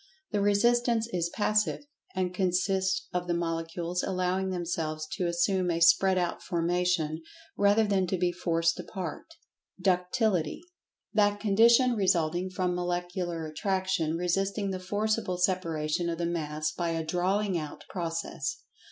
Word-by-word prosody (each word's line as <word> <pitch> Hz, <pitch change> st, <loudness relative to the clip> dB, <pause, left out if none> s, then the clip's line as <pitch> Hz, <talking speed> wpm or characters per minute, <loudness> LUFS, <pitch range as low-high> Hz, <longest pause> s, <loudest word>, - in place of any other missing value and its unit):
The 205 Hz, -2 st, +1 dB
resistance 230 Hz, +3 st, +3 dB
is 170 Hz, -1 st, 0 dB
"passive," 210 Hz, +7 st, 0 dB, 0.3 s
and 185 Hz, -1 st, -1 dB
consists 190 Hz, 0 st, +1 dB
of 180 Hz, 0 st, -2 dB
the 175 Hz, -, +1 dB
Molecules 170 Hz, +1 st, -2 dB
allowing 185 Hz, 0 st, -1 dB
themselves 165 Hz, -3 st, -2 dB
to 190 Hz, -2 st, -1 dB
assume 180 Hz, +2 st, +1 dB
a 165 Hz, -1 st, 0 dB
spread 185 Hz, +3 st, +5 dB
out 175 Hz, -1 st, -1 dB
formation, 170 Hz, -2 st, 0 dB, 0.3 s
rather 205 Hz, +2 st, +4 dB
than 195 Hz, -3 st, +1 dB
to 185 Hz, -, -1 dB
be 180 Hz, 0 st, +1 dB
forced 165 Hz, -1 st, 0 dB
apart. 190 Hz, -, -6 dB, 0.4 s
Ductility: 180 Hz, -, +1 dB, 0.5 s
That 205 Hz, -1 st, +3 dB
condition 230 Hz, +4 st, +5 dB
resulting 180 Hz, -3 st, +1 dB
from 185 Hz, -1 st, -1 dB
Molecular 175 Hz, -1 st, -2 dB
Attraction 180 Hz, -1 st, -1 dB
resisting 195 Hz, +3 st, 0 dB
the 185 Hz, -, -3 dB
forcible 205 Hz, 0 st, -1 dB
separation 170 Hz, -3 st, 0 dB
of 165 Hz, -, -2 dB
the 170 Hz, -, -1 dB
Mass 155 Hz, -2 st, -2 dB
by 170 Hz, +2 st, -2 dB
a 165 Hz, -1 st, -2 dB
"drawing 185 Hz, +4 st, 0 dB
out" 155 Hz, -3 st, -5 dB
process. 165 Hz, -5 st, -3 dB
180 Hz, 135 wpm, -29 LUFS, 170-195 Hz, 0.5 s, spread